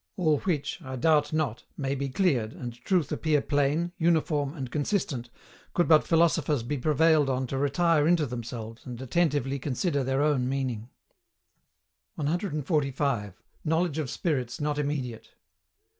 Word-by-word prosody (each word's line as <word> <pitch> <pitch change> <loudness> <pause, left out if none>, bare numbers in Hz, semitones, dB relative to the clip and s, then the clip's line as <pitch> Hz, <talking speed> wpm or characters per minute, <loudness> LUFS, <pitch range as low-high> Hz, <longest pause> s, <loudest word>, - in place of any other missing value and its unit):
All 155 -6 +2
which, 170 -2 -2
I 130 -3 -6
doubt 150 +2 +3
not, 155 -7 -1
may 135 -1 -1
be 140 0 -2
cleared, 130 - +1
and 120 -2 -6
truth 155 +7 0
appear 155 -2 +2
plain, 145 +4 +1
uniform, 160 -3 +1
and 130 -5 -5
consistent, 145 - -1 0.5
could 175 - +3
but 155 -2 +5
philosophers 160 -5 +2
be 135 +4 -3
prevailed 155 +1 +3
on 130 0 0
to 135 +2 -3
retire 150 +2 +3
into 170 -3 +3
themselves, 115 -2 -6
and 125 -2 -7
attentively 140 0 0
consider 140 +2 -1
their 135 +2 +1
own 135 -4 +2
meaning. 130 -4 -2 1.3
145. 145 - -1 0.2
KNOWLEDGE 160 -1 0
OF 145 -5 -2
SPIRITS 130 -8 -2
NOT 150 0 -1
IMMEDIATE. 135 -6 -3
145 Hz, 140 wpm, -28 LUFS, 130-160 Hz, 1.3 s, but